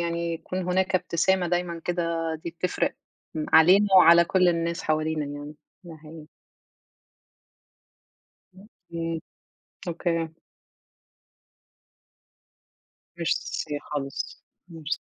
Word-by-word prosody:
يعني 170 0 -2
يكون 185 +3 -5
هناك 185 +1 0
ابتسامة 180 +1 +2
دايمًا 175 -1 -1
كده، 165 -2 -1
دي 170 - -3
بتفرق 170 +2 -1 0.4
م 155 -1 -3
علينا 185 +6 +7
وعلى 170 -1 +8
كل 185 +1 +3
الناس 170 +1 -1
حوالينا 155 -1 0
يعني. 145 +1 -7 0.3
ده 165 -2 -10
حقيقي. 155 0 -12 2.3
أوكي، 170 -5 -6 0.7
أوكي. 165 -1 -1 2.9
ميرسي 145 - -2
خالص، 140 -2 -4 0.3
ميرس 160 -2 -4
170 Hz, 90 wpm, -26 LUFS, 160-175 Hz, 2.9 s, وعلى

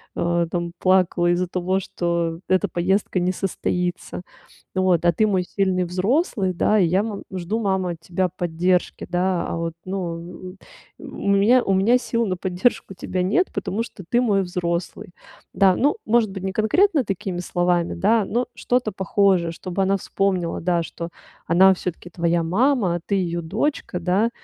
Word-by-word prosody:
э, 170 0 0
там 170 -1 -2
плакала 185 -2 +3
из-за 180 +1 0
того, 185 +2 -1
что 170 -3 -2
эта 185 -1 +2
поездка 185 +2 0
не 180 +1 +1
состоится. 180 -1 -3 0.5
Вот, 185 -3 +2
а 175 - +6
ты 215 +6 +2
мой 190 -3 +1
сильный 185 0 0
взрослый, 190 - 0
да, 210 +4 +2
и 185 - +4
я, 185 +4 +2
мол, 215 -3 -5
жду, 185 +4 -2
мама, 190 -4 0
от 170 - -7
тебя 180 +2 -1
поддержки, 175 +1 0
да. 180 0 0
А - - -3
вот, 165 0 -3
ну, 180 -1 -6 0.4
у - - -12
у - - -8
у - - -6
меня, 210 +6 +4
у 195 - +1
меня 205 +6 +4
сил 235 -2 -1
на 185 -3 -1
поддержку 190 +3 -1
тебя 185 +1 -3
нет, 215 - +2
потому 200 +2 -2
что 205 -4 -10
ты 240 - +3
мой 205 -5 +2
взрослый". 175 -1 -3 0.4
Да, 190 -2 +4
ну, 290 - +2
может 225 -2 +2
быть, 190 -1 -7
не 190 - -2
конкретно 280 - +2
такими 195 -2 -4
словами, 175 -1 0
да, 210 +4 +2
но 240 +5 -1
что-то 245 -3 0
похожее, 190 -2 +2
чтобы 185 +3 -3
она 195 +1 +2
вспомнила, 185 -3 -1
да, 175 0 +1
что 170 +1 -7 0.4
она 190 +3 +6
всё-таки 175 -1 -6
твоя 170 0 0
мама, 200 - +2
а - - -2
ты - - -3
её 175 -3 -1
дочка, 205 - -2
да. 195 +6 +1
185 Hz, 175 wpm, -22 LUFS, 175-200 Hz, 0.5 s, а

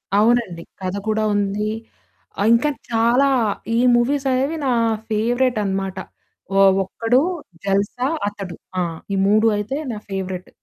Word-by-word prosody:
అవునండి. 215 -5 +2 0.2
కథ 185 +1 -3
కూడా 215 0 +1
ఉంది. 205 +1 0 0.7
ఆహ్, 205 - +2
ఇంకా 235 +6 +3 0.2
చాలా 235 +4 +3 0.5
ఈ - - +2 0.2
మూవీసనేవి 270 +4 +1
నా 260 - +2 0.4
ఫేవరేటన్నమాట. 215 -4 0 0.6
ఒ - - +3 0.3
'ఒక్కడు', 230 +8 +1 0.4
'జల్సా' 200 +7 0 0.2
అతడు 195 -4 -6 0.3
ఆ! - - +2 0.3
ఈ - - +1
3 215 +2 +4
అయితే 215 +7 -3
నా 215 - -5
ఫేవరెట్. 190 -2 -4
215 Hz, 120 wpm, -21 LUFS, 195-245 Hz, 0.7 s, 3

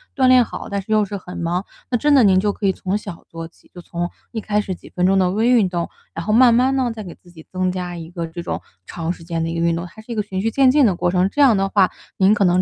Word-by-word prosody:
锻 260 -2 +3
炼 255 -2 +6
好。 - - -8
但 200 -1 -2
是 195 - -10
又 215 -1 +4
是 200 0 -4
很 180 -1 -10
忙， 175 +3 -2 0.2
那 245 - +1
真 295 +5 +2
的 265 - +6
您 190 -3 +5
就 205 0 0
可 200 - -2
以 - - +4
从 190 +1 -3
小 200 -5 -9
做 165 0 -7
起， 165 - -26
就 175 - -10
从 175 0 -4 0.2
一 225 - -4
开 210 0 0
始 195 - -4
几 - - -15
分 180 - -1
钟 195 +1 +3
的 185 -1 +2
微 220 +4 +1
运 230 -6 +4
动。 175 -2 -3 0.2
然 165 - -5
后 215 - 0
慢 240 +1 +6
慢 255 +3 +3
呢 255 -3 0
再 220 -2 -7
给 175 - -9
自 175 - -21
己 160 -2 -14
增 185 0 0
加 180 -1 -5
一 165 -1 -8
个 170 -1 -5
这 170 +1 -7
种 - - -4 0.2
长 165 -1 -4
时 165 - -14
间 165 0 -3
的 165 - -2
一 165 - -3
个 165 - +1
运 170 0 +2
动， 170 +1 -4
它 220 - -14
是 225 - -11
一 - - -3
个 215 - +1
循 190 -2 -4
序 225 - 0
渐 270 +2 +4
进 285 -1 +4
的 190 -5 +2
过 175 - 0
程， 185 +1 +2
这 290 - -1
样 265 -6 +6
的 195 0 0
话 195 -2 +3 0.3
您 195 +2 +5
可 210 - +2
能 180 +1 +3
190 Hz, 345 characters per minute, -20 LUFS, 175-220 Hz, 0.3 s, 炼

